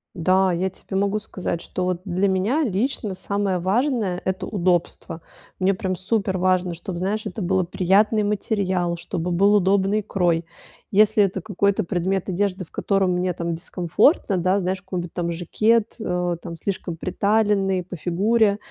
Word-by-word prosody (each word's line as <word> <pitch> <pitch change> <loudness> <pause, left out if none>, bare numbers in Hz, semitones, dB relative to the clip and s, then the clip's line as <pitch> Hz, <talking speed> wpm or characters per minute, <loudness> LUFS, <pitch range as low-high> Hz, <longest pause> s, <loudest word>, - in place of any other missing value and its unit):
Да, 185 +2 +3
я 180 +2 0
тебе 190 - -6
могу 200 +2 +1
сказать, 185 -5 -4
что 185 - -4
вот 180 -1 -1
для 190 +1 0
меня 200 +11 +1
лично 215 -2 -1
самое 195 -1 -1
важное- 210 -1 0
это 190 0 -2
удобство. 175 -3 -1 0.4
Мне 190 +1 +2
прям 185 0 -2
суперважно, 185 -3 0
чтобы, 175 +2 -6
знаешь, 200 +4 -2
это 210 - -5
было 185 +1 +1
приятный 195 +5 +2
материал, 190 -4 -1
чтобы 170 0 -4
был 200 +4 +4
удобный 195 +2 +2
крой. 175 -4 0 0.5
Если 210 +1 +5
это 190 -1 -1
какой-то 200 +1 0
предмет 185 +2 -1
одежды, 190 0 -1
в - - -27
котором 195 -2 +1
мне 180 0 0
там 170 0 -3
дискомфортно, 180 - +1
да, 185 +3 +2
знаешь, 185 0 -2
какой-нибудь 180 -2 -5
там 170 -1 -2
жакет, 215 +6 +1
э, 180 -4 -1
там, 170 -1 -7
слишком 175 -1 -4
приталенный 195 0 +1
по 180 - -8
фигуре, 200 +5 +2
190 Hz, 155 wpm, -23 LUFS, 180-205 Hz, 0.5 s, Если